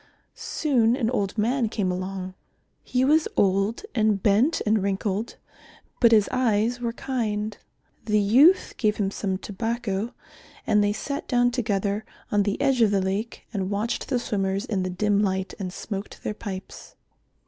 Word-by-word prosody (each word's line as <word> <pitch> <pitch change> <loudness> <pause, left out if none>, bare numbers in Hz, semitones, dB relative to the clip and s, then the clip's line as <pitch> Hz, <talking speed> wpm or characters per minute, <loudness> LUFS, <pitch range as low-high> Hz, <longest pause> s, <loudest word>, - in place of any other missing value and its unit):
Soon 245 -6 +1
an 240 -3 0
old 205 -4 -1
man 235 +2 +1
came 200 -4 -1
along. 185 0 -4 0.5
He 255 +1 +1
was 310 +3 +4
old 195 - +2
and 215 -3 +2
bent 220 +10 +3
and 215 -1 +2
wrinkled, 200 +2 -2 0.6
but 235 -2 +6
his 215 -3 +5
eyes 240 -1 +1
were 235 -1 -1
kind. 215 -5 -2 0.5
The 210 -1 +2
youth 260 - +5
gave 215 -2 +1
him 195 -2 0
some 190 -2 -2
tobacco 225 +1 -3 0.5
and 210 -1 +3
they 205 - +2
sat 280 +7 -4
down 245 -1 +3
together 210 -3 -1 0.3
on 205 - +3
the 200 0 -1
edge 270 -3 +2
of 220 - +5
the 200 -1 +2
lake 195 +4 -3
and 190 -3 -2
watched 210 +3 -2
the 260 - +2
swimmers 200 -3 -1
in 205 -6 -1
the 185 - -2
dim 205 +3 +1
light, 190 -1 -1
and 185 -2 -4
smoked 200 +1 -6
their - - -2
pipes. 200 -3 -8
210 Hz, 160 wpm, -25 LUFS, 195-235 Hz, 0.6 s, but